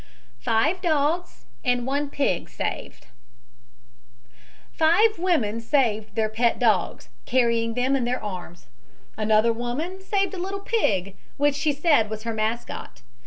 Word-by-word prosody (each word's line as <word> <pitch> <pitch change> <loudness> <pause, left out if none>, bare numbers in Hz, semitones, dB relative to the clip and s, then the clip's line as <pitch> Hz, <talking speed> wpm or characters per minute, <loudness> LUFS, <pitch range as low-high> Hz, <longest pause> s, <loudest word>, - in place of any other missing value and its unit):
FIVE 280 - +1
DOGS 325 +1 0 0.2
AND 245 -3 +1
ONE 280 +2 -1
PIG 275 -11 -1
SAVED - - -5 1.7
"Five 350 +6 +3
women 245 - +1
saved 220 -5 0
their 220 -1 +1
pet 230 +2 +1
dogs, 215 -8 +1 0.2
carrying 235 -2 +2
them 255 +2 +1
in 265 - 0
their 245 +1 0
arms. 180 - -7 0.5
Another 215 +2 +3
woman 275 +11 -4
saved 390 +1 0
a 380 - -5
little 390 +2 -3
pig, 200 - 0 0.2
which 290 0 +3
she 300 +2 +1
said 285 -7 +3
was 215 0 -6
her 230 0 -3
mascot. 220 +2 -4
245 Hz, 130 wpm, -24 LUFS, 220-315 Hz, 1.7 s, Five